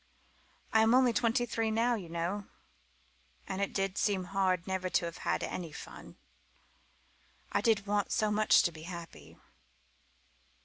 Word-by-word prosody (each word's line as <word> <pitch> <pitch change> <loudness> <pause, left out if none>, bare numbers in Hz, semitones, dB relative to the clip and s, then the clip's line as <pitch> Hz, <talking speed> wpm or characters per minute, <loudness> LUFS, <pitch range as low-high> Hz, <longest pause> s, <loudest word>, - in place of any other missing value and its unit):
I 220 - +6
am 225 +2 +5
only 255 -2 +5
twenty 240 +2 +2
three 225 -2 -1
now, 230 +3 +2
you 190 -7 -4
know 175 +5 -3 1.0
and 190 +1 -3
it 200 - 0
did 195 -1 -1
seem 200 -3 +1
hard 185 -1 0
never 185 -1 -2
to 175 - +1
have 170 -1 -6
had - - -1
any 170 -3 -4
fun. - - -10 1.4
I - - +1
did 220 -4 +2
want 205 0 0
so 215 -1 +1
much 215 0 +5
to 175 - +1
be 155 -1 -11
happy." 170 -2 -9
200 Hz, 150 wpm, -31 LUFS, 180-220 Hz, 1.4 s, I